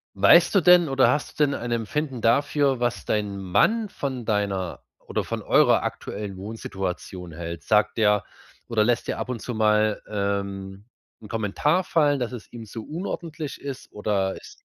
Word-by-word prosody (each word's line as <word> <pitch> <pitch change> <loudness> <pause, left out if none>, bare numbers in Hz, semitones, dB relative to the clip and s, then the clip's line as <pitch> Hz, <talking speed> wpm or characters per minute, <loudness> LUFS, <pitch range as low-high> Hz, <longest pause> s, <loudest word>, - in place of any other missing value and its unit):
Weißt 165 - +6
du 195 - +6
denn 175 -2 +6
oder 135 -1 +4
hast 145 +1 -2
du - - +7
denn 140 -1 0
ein 120 - -4
Empfinden 125 +3 -2
dafür, 140 +3 +2
was 110 - -1
dein 105 -2 -1
Mann 215 - +2
von 130 - -5
deiner 100 -4 -1
oder - - -3
von - - -4
eurer - - +4
aktuellen 100 -2 -5
Wohnsituation 95 -3 -5
hält? 85 +1 -6
Sagt 105 0 +2
der 105 -2 +3 0.5
oder 110 -2 +2
lässt 120 +1 0
der - - -2
ab - - -4
und 120 -3 -3
zu 125 - -5
mal 110 -1 +2
ähm, 100 -1 -3 0.4
'n 105 - -10
Kommentar 115 - +1
fallen, 145 -5 +2
dass 125 0 -2
es 120 -3 -9
ihm 115 -2 -8
zu 110 +1 -8
unordentlich 160 -2 -5
ist 140 -2 -7
oder 100 -2 -1
ist 415 0 -15
110 Hz, 170 wpm, -25 LUFS, 100-140 Hz, 0.5 s, du